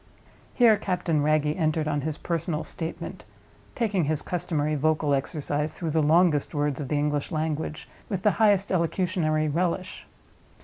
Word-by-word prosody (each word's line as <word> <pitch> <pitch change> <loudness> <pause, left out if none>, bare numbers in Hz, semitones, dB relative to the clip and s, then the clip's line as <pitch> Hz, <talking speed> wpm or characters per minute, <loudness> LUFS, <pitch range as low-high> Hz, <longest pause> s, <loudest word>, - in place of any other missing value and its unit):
Here 230 -4 +6
Captain 180 -6 0
Wragge 150 0 +2
entered 155 -2 0
on 145 -1 0
his 155 +1 -3
personal 165 -2 -2
statement; 170 +2 -6 0.5
taking 205 -8 +1
his 155 0 -1
customary 160 -4 -1
vocal 155 0 +1
exercise 145 +2 -2
through 165 -3 -3
the 160 +1 +2
longest 155 0 +3
words 145 -1 0
of 140 - -4
the 145 - 0
English 145 +1 -1
language, 155 -1 -3 0.2
with 190 -3 -3
the 210 - +5
highest 205 -2 +4
elocutionary 170 -3 +1
relish. 180 +4 -2
155 Hz, 145 wpm, -26 LUFS, 150-180 Hz, 0.5 s, Here